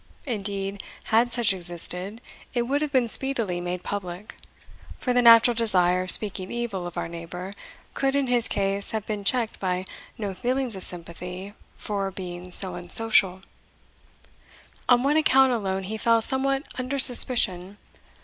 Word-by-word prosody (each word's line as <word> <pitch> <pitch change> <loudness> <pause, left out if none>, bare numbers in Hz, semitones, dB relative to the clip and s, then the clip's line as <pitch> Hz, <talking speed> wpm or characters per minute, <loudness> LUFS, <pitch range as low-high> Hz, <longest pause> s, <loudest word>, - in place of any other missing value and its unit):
Indeed, 200 -4 -2 0.3
had 235 +2 +3
such 230 -4 +2
existed, 180 +4 -5 0.3
it 240 - +1
would 280 +4 -1
have 300 -2 -3
been 255 -4 +1
speedily 230 -8 0
made 175 0 -5
public; 195 0 -6 0.6
for 250 - -2
the 245 - +3
natural 235 0 +7
desire 185 -6 +2
of 185 - -5
speaking 195 -3 +3
evil 225 -7 -4
of 175 - -10
our - - -3
neighbour 175 +3 -8 0.4
could 270 0 -1
in 280 -1 +1
his 245 -2 0
case 195 0 -2
have 215 - -7
been 210 -2 -5
checked 230 +1 0
by 185 -1 -2 0.3
no 205 -3 -4
feelings 250 +2 -2
of 190 - -7
sympathy 180 +3 -3 0.2
for 200 -2 -4
a - - -6
being 180 -1 -8
so 185 +1 +5
unsocial. 185 +1 +3 1.5
On 245 -1 +4
one 290 +3 +2
account 265 -4 +4
alone 195 -4 -3
he 215 +4 -5
fell 230 +1 +2
somewhat 270 +2 0 0.2
under 255 +2 -3
suspicion. 215 -7 +3
205 Hz, 155 wpm, -24 LUFS, 185-245 Hz, 1.5 s, natural